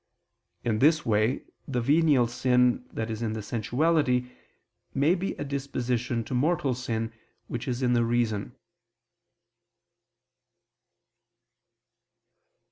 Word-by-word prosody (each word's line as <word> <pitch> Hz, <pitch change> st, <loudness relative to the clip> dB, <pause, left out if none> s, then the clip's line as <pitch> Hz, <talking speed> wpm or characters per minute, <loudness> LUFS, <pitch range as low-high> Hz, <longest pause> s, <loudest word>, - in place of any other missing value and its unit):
In 110 Hz, -2 st, 0 dB
this 155 Hz, +4 st, +4 dB
way 110 Hz, +3 st, +1 dB, 0.2 s
the 125 Hz, -3 st, -1 dB
venial 145 Hz, 0 st, +4 dB
sin 125 Hz, +1 st, +2 dB
that 115 Hz, 0 st, -3 dB
is 110 Hz, 0 st, -4 dB
in 110 Hz, -2 st, -1 dB
the 110 Hz, -1 st, -5 dB
sensuality, 125 Hz, +3 st, +1 dB, 0.6 s
may 145 Hz, +5 st, +4 dB
be 195 Hz, +1 st, -2 dB
a -, -, -5 dB
disposition 125 Hz, -4 st, -2 dB
to 120 Hz, -, -7 dB
mortal 140 Hz, +1 st, +1 dB
sin, 115 Hz, -2 st, -3 dB, 0.3 s
which 120 Hz, +1 st, -5 dB
is 125 Hz, 0 st, -2 dB
in 125 Hz, -1 st, +3 dB
the 120 Hz, -1 st, +3 dB
reason. 115 Hz, -3 st, -1 dB
125 Hz, 110 wpm, -27 LUFS, 115-140 Hz, 0.6 s, this